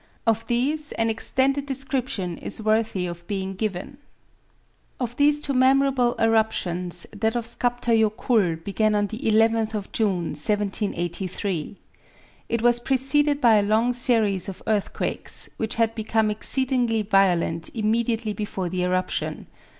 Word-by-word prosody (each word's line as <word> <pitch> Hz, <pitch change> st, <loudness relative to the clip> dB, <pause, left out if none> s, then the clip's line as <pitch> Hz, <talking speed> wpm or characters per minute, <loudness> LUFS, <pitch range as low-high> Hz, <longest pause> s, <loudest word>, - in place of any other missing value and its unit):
Of 225 Hz, 0 st, +1 dB
these 290 Hz, +6 st, 0 dB
an 225 Hz, 0 st, +1 dB
extended 270 Hz, +5 st, 0 dB
description 260 Hz, -, -2 dB
is -, -, -4 dB
worthy 215 Hz, -3 st, 0 dB
of 170 Hz, -1 st, -7 dB
being 195 Hz, -1 st, -3 dB
given. 205 Hz, +6 st, -4 dB, 1.0 s
Of 245 Hz, -2 st, -3 dB
these 295 Hz, +1 st, +4 dB
two 290 Hz, -2 st, -1 dB
memorable 260 Hz, -1 st, +3 dB
eruptions, 180 Hz, -6 st, +1 dB
that 220 Hz, +1 st, -1 dB
of 235 Hz, -1 st, -1 dB
Skaptar 245 Hz, 0 st, 0 dB
Jokull 215 Hz, -4 st, +2 dB
began 215 Hz, +2 st, +1 dB
on 205 Hz, 0 st, +2 dB
the 220 Hz, +2 st, -6 dB
11th 225 Hz, 0 st, +2 dB
of 205 Hz, -2 st, -5 dB
June, 190 Hz, -6 st, 0 dB
1783. 190 Hz, -1 st, -2 dB, 0.7 s
It 230 Hz, -1 st, -1 dB
was 240 Hz, 0 st, +5 dB
preceded 275 Hz, +3 st, +1 dB
by 230 Hz, -5 st, +5 dB
a -, -, +4 dB
long 220 Hz, +4 st, +2 dB
series 220 Hz, -7 st, +1 dB
of 190 Hz, -, -9 dB
earthquakes, 215 Hz, -2 st, -2 dB
which 220 Hz, +2 st, -2 dB
had 225 Hz, -1 st, +1 dB
become 220 Hz, -1 st, 0 dB
exceedingly 245 Hz, 0 st, 0 dB
violent 180 Hz, -5 st, +2 dB
immediately 225 Hz, 0 st, 0 dB
before 195 Hz, -4 st, -4 dB
the 180 Hz, +1 st, -2 dB
eruption. 185 Hz, 0 st, -1 dB
220 Hz, 135 wpm, -24 LUFS, 195-245 Hz, 1.0 s, was